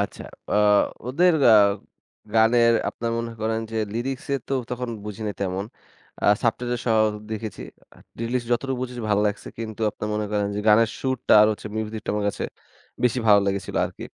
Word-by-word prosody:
আচ্ছা, 100 Hz, -, -4 dB, 0.3 s
অ্যা -, -, +2 dB, 0.5 s
ওদের 175 Hz, +7 st, +4 dB, 0.2 s
আ -, -, +8 dB, 0.8 s
গানের 115 Hz, +1 st, +5 dB, 0.2 s
আপনার 115 Hz, 0 st, -4 dB
মনে 115 Hz, 0 st, -4 dB
করেন 110 Hz, +1 st, -1 dB
যে 115 Hz, -, -4 dB, 0.2 s
লিরিক্সে 135 Hz, +3 st, -3 dB
তো -, -, -3 dB, 0.2 s
তখন 125 Hz, 0 st, -3 dB, 0.2 s
বুঝি 105 Hz, +1 st, -7 dB
নে -, -, -2 dB
তেমন, 95 Hz, 0 st, -2 dB, 0.6 s
আ -, -, -2 dB, 0.2 s
সাবটাইটেল 120 Hz, +1 st, 0 dB
সহ 110 Hz, -2 st, +3 dB, 0.3 s
দেখেছি। 110 Hz, 0 st, -5 dB, 0.3 s
আ -, -, -18 dB, 0.2 s
লিরিক্স 120 Hz, +1 st, -2 dB
যতটুকু 130 Hz, +2 st, -1 dB
বুঝেছি 125 Hz, -2 st, -5 dB
ভালো 105 Hz, 0 st, +3 dB
লাগছে। 105 Hz, -, -3 dB
কিন্তু 110 Hz, -1 st, -6 dB
আপনারা 105 Hz, -, -6 dB
মনে 105 Hz, 0 st, -1 dB
করেন 105 Hz, -1 st, +1 dB
যে 105 Hz, -, -2 dB
গানের 110 Hz, +1 st, +6 dB
সুরটা 130 Hz, -4 st, +1 dB
আর -, -, +6 dB
হচ্ছে 105 Hz, -, -8 dB
মিউজিকটা 110 Hz, 0 st, -4 dB
আমার 105 Hz, -1 st, -1 dB
কাছে -, -, -4 dB, 0.6 s
বেশি 125 Hz, +1 st, +2 dB
ভালো 100 Hz, -1 st, +7 dB
লেগেছিল 100 Hz, -1 st, -2 dB
আরকি। -, -, -7 dB
115 Hz, 175 wpm, -24 LUFS, 105-120 Hz, 0.8 s, আ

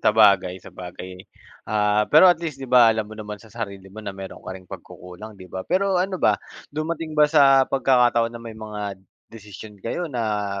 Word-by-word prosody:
sabagay, 100 Hz, -4 st, +4 dB
sabagay. 90 Hz, +1 st, -9 dB, 0.5 s
Ah, 105 Hz, 0 st, +1 dB
pero, 155 Hz, +5 st, +7 dB
at 175 Hz, -, +1 dB
least, 155 Hz, -5 st, -4 dB
'di 135 Hz, -, -7 dB
ba, 120 Hz, -2 st, +7 dB
alam 110 Hz, -1 st, +1 dB
mo 110 Hz, -, -10 dB
naman 105 Hz, 0 st, -6 dB
sa 110 Hz, -2 st, -17 dB
sarili 100 Hz, -4 st, -7 dB
mo 110 Hz, -, -9 dB
na 100 Hz, -2 st, -7 dB
meron 95 Hz, -1 st, -9 dB
ka -, -, -9 dB
ring 95 Hz, -1 st, -16 dB
pagkukulang, 100 Hz, +4 st, -11 dB
'di 95 Hz, -1 st, -12 dB
ba? 95 Hz, -, -5 dB
Pero 190 Hz, 0 st, +1 dB
ano 190 Hz, 0 st, -1 dB
ba, -, -, +2 dB, 0.3 s
dumating 155 Hz, +1 st, -4 dB
ba 150 Hz, -1 st, +5 dB
sa 135 Hz, -3 st, +5 dB
pagkakataon 120 Hz, -3 st, +2 dB
na 115 Hz, -, -9 dB
may 115 Hz, -1 st, -9 dB
mga, 105 Hz, -2 st, -6 dB, 0.4 s
desisyon 105 Hz, 0 st, -11 dB
kayo 170 Hz, +9 st, -3 dB
na, 105 Hz, -6 st, -2 dB
110 Hz, 190 wpm, -23 LUFS, 100-135 Hz, 0.5 s, pero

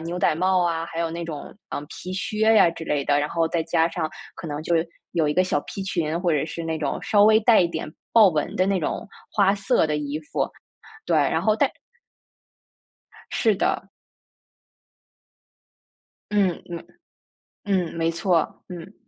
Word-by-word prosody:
牛 170 Hz, +2 st, -4 dB
仔 -, -, +3 dB
帽 185 Hz, +2 st, +2 dB
啊， 165 Hz, -1 st, 0 dB
还 165 Hz, 0 st, -5 dB
有 165 Hz, -1 st, -1 dB
那 170 Hz, +1 st, -4 dB
种， 155 Hz, -3 st, -7 dB, 0.2 s
嗯， 145 Hz, -, -4 dB
皮 185 Hz, -, -7 dB
靴 215 Hz, +2 st, -2 dB
呀 190 Hz, -, +7 dB
之 165 Hz, -1 st, -8 dB
类 145 Hz, -2 st, 0 dB
的， 145 Hz, 0 st, +3 dB
然 150 Hz, +1 st, 0 dB
后 165 Hz, -1 st, 0 dB
再 165 Hz, 0 st, 0 dB
加 165 Hz, 0 st, +2 dB
上 165 Hz, -2 st, -3 dB, 0.2 s
可 -, -, -8 dB
能 150 Hz, 0 st, -4 dB
就 170 Hz, -, 0 dB, 0.4 s
有 165 Hz, -3 st, +1 dB
一 -, -, +1 dB
个 185 Hz, -, +3 dB
小 185 Hz, -, 0 dB
皮 195 Hz, -, -6 dB
裙， 170 Hz, -4 st, -1 dB
或 180 Hz, -, +1 dB
者 150 Hz, -3 st, +1 dB
是 165 Hz, +1 st, -6 dB
那 160 Hz, -1 st, -2 dB
种 145 Hz, -, -2 dB
稍 205 Hz, -1 st, +4 dB
微 220 Hz, +1 st, +6 dB
带 225 Hz, -1 st, +5 dB
一 175 Hz, -, +4 dB
点 155 Hz, -, -5 dB, 0.2 s
豹 220 Hz, -4 st, +8 dB
纹 155 Hz, -4 st, -1 dB
的 185 Hz, -, +2 dB
那 195 Hz, -1 st, +1 dB
种 190 Hz, +7 st, -3 dB, 0.2 s
花 200 Hz, -2 st, +4 dB
色 200 Hz, -1 st, +2 dB
的 150 Hz, -1 st, -1 dB
衣 150 Hz, +1 st, -3 dB
服， 150 Hz, -, -2 dB, 0.6 s
对， -, -, +2 dB
然 -, -, +2 dB
后 215 Hz, -1 st, +3 dB
但 -, -, +2 dB, 1.6 s
是 220 Hz, -3 st, +2 dB
的。 380 Hz, -, -1 dB, 2.4 s
嗯 195 Hz, -4 st, +1 dB
嗯。 170 Hz, -1 st, -7 dB, 0.8 s
嗯， 185 Hz, -4 st, 0 dB
没 165 Hz, 0 st, +1 dB
错， 170 Hz, -1 st, 0 dB
嗯。 180 Hz, +3 st, -9 dB
170 Hz, 190 characters per minute, -24 LUFS, 160-195 Hz, 2.4 s, 豹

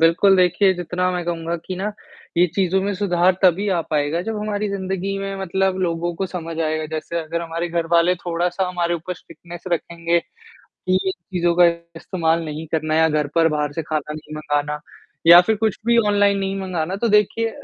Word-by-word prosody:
बिल्कुल 175 Hz, +4 st, +5 dB
देखिए, 185 Hz, +2 st, +4 dB
जितना 180 Hz, +1 st, -1 dB
मैं 180 Hz, -1 st, -3 dB
कहूँगा 170 Hz, 0 st, -2 dB
कि 185 Hz, -, -4 dB
ना 205 Hz, +3 st, -3 dB, 0.4 s
ये 175 Hz, +1 st, +5 dB
चीज़ों 190 Hz, -1 st, +2 dB
में 200 Hz, +1 st, -1 dB
सुधार 185 Hz, -2 st, +2 dB
तभी 190 Hz, +3 st, +3 dB
आ 180 Hz, -3 st, +1 dB
पाएगा 150 Hz, +2 st, 0 dB
जब 220 Hz, +3 st, -4 dB
हमारी 210 Hz, 0 st, -2 dB
ज़िंदगी 195 Hz, 0 st, -3 dB
में 195 Hz, 0 st, -4 dB
मतलब 190 Hz, 0 st, 0 dB
लोगों 170 Hz, -1 st, -1 dB
को 190 Hz, -, -2 dB
समझ 165 Hz, -3 st, -6 dB
आएगा। 155 Hz, -1 st, -1 dB
जैसे 170 Hz, +2 st, -4 dB
अगर 165 Hz, +1 st, -4 dB
हमारे 170 Hz, +1 st, -3 dB
घरवाले 170 Hz, +1 st, +2 dB
थोड़ा-सा 175 Hz, +2 st, -2 dB
हमारे 175 Hz, -1 st, -1 dB
ऊपर 170 Hz, +2 st, -5 dB
स्ट्रिक्टनेस 175 Hz, 0 st, -12 dB
रखेंगे 170 Hz, 0 st, 0 dB, 0.5 s
कि 185 Hz, -, -4 dB
इन 190 Hz, -, +2 dB, 0.2 s
चीज़ों 175 Hz, -1 st, +2 dB
का 175 Hz, 0 st, +7 dB, 0.3 s
इस्तेमाल 165 Hz, -1 st, -1 dB
नहीं 155 Hz, +1 st, -5 dB
करना 155 Hz, -1 st, 0 dB
है 160 Hz, -, +3 dB
या 160 Hz, -, +5 dB
घर 150 Hz, -1 st, 0 dB
पर 165 Hz, -1 st, +5 dB
बाहर 150 Hz, -1 st, -1 dB
से 165 Hz, -, -2 dB
खाना 150 Hz, -1 st, -3 dB
नहीं 155 Hz, 0 st, -9 dB
मँगाना 150 Hz, -1 st, -2 dB, 0.5 s
या 170 Hz, +1 st, +11 dB
फिर 220 Hz, +4 st, +1 dB
कुछ 220 Hz, -1 st, 0 dB
भी 235 Hz, 0 st, +4 dB
ऑनलाइन 205 Hz, -1 st, +3 dB
नहीं 195 Hz, 0 st, -2 dB
मँगाना, 185 Hz, -2 st, -2 dB
तो 235 Hz, +4 st, 0 dB
देखिए 210 Hz, +2 st, +2 dB
175 Hz, 195 wpm, -21 LUFS, 165-190 Hz, 0.5 s, या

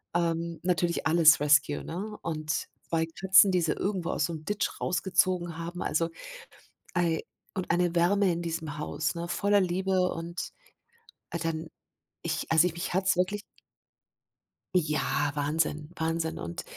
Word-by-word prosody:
Ähm, 170 Hz, -1 st, 0 dB
natürlich 175 Hz, -2 st, +1 dB
alles 160 Hz, -2 st, +6 dB
Rescue, 145 Hz, 0 st, +3 dB
ne? 205 Hz, +6 st, -5 dB
Und 155 Hz, -2 st, -2 dB, 0.2 s
2 165 Hz, -1 st, +1 dB
Katzen, 190 Hz, +3 st, +5 dB
die 180 Hz, -, +2 dB
sie 160 Hz, -2 st, +1 dB
irgendwo 185 Hz, -4 st, -2 dB
aus 150 Hz, -, +1 dB
so 170 Hz, -, -4 dB
'nem 155 Hz, -1 st, -8 dB
Ditch 210 Hz, 0 st, -2 dB
rausgezogen 180 Hz, -2 st, +1 dB
haben, 170 Hz, +2 st, -5 dB
also 165 Hz, +2 st, 0 dB, 0.9 s
I 165 Hz, -2 st, +1 dB, 0.3 s
und 185 Hz, -2 st, -4 dB
eine 175 Hz, 0 st, +2 dB
Wärme 185 Hz, +2 st, +3 dB
in 170 Hz, -, -3 dB
diesem 160 Hz, -3 st, -4 dB
Haus, 150 Hz, +1 st, -2 dB
ne, 170 Hz, 0 st, -4 dB
voller 200 Hz, +2 st, +2 dB
Liebe 185 Hz, 0 st, +1 dB
und 170 Hz, +1 st, -5 dB, 0.9 s
dann 165 Hz, 0 st, -3 dB, 0.6 s
ich 170 Hz, -1 st, -2 dB
also 160 Hz, +2 st, +6 dB
mich 170 Hz, +2 st, -5 dB
hat's 190 Hz, 0 st, +2 dB
wirklich 200 Hz, +3 st, 0 dB, 1.3 s
Ja, 150 Hz, -3 st, +1 dB
Wahnsinn, 150 Hz, +1 st, -1 dB
Wahnsinn. 160 Hz, 0 st, -1 dB
Und 85 Hz, 0 st, -5 dB
170 Hz, 140 wpm, -28 LUFS, 160-180 Hz, 1.3 s, alles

